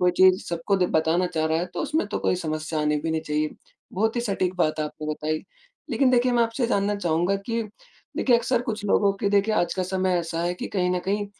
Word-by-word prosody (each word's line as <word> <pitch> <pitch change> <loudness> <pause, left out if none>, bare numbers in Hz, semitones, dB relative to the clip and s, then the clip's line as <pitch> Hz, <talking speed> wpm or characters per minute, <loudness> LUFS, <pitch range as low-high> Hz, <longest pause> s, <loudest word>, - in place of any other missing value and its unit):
कोई 180 0 +4
चीज़ 185 +1 +5
सबको 170 +4 0
द 190 - +1
बताना 160 +3 +2
चाह 160 -3 -1
रहा 160 +1 +1
है, 175 - -1
तो 175 -1 -6
उसमें 310 -7 0
तो - - -2
कोई - - +1
समस्या 155 -2 -3
आनी 150 0 +1
भी 160 +2 -2
नहीं 160 - 0
चाहिए, 150 -1 -1 0.4
बहुत 220 +5 0
ही - - +2
सटीक 195 -5 -1
बात 155 -3 +1
आपने 150 0 -5
बताई। 155 +1 -3 0.5
लेकिन 265 -2 +3
देखिए, 250 0 +3
मैं 240 -1 +4
आपसे 230 +2 -2
ये 235 - +2
जानना 200 -2 +1
चाहूँगा 175 +1 +1
कि, 230 +3 -3 0.5
देखिए, 245 -3 +4
अक्सर 240 +1 0
कुछ 215 -3 -4
लोगों 200 0 +3
की 200 - +1
देखिए, 205 +2 +2
आज 175 -4 +1
का 185 - -1
समय 185 0 0
ऐसा 165 0 -3
है 175 +1 0
कि - - -5
कहीं 180 -2 0
न 180 - +1
कहीं 205 +1 -1
185 Hz, 240 wpm, -25 LUFS, 165-210 Hz, 0.5 s, चीज़